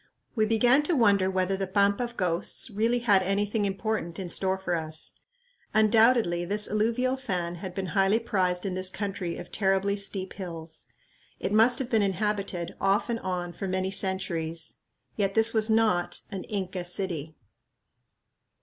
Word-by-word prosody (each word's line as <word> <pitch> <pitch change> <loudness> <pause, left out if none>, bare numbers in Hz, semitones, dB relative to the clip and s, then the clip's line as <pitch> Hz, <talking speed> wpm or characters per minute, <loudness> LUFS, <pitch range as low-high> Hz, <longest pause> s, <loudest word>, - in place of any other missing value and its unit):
We 215 -3 +1
began 240 +5 +4
to 345 - +3
wonder 200 -6 +4
whether 190 0 0
the 195 0 -2
"Pampa 200 +3 +2
of 240 0 -10
Ghosts" 180 +6 -1
really 225 +4 +1
had 200 -4 +5
anything 205 +3 0
important 195 -3 -2
in 185 -2 -5
store 190 +2 +1
for 190 -2 -3
us. 155 -1 -3 0.6
Undoubtedly 220 -4 +4
this 205 +4 0
alluvial 235 +5 +1
fan 180 -10 -3
had 185 -2 -6
been 195 - -2
highly 195 +1 +3
prized 190 -5 0
in 190 - -2
this 185 0 -1
country 195 -3 -4
of - - -9
terribly 195 0 +1
steep 195 -2 -4
hills. 165 -4 -7 0.5
It 200 - -2
must 230 +3 +5
have 265 -2 -4
been 225 -2 +3
inhabited, 200 -3 -1
off 195 +4 +2
and 230 - -1
on, 180 -3 -3
for 195 - -5
many 185 0 -1
centuries. 170 -4 0 0.4
Yet 195 -2 0
this 225 0 +5
was 220 0 +2
not 220 -6 +2
an 195 -2 -5
"Inca 190 -3 -3
city." 175 -4 -3
195 Hz, 160 wpm, -27 LUFS, 185-215 Hz, 0.6 s, had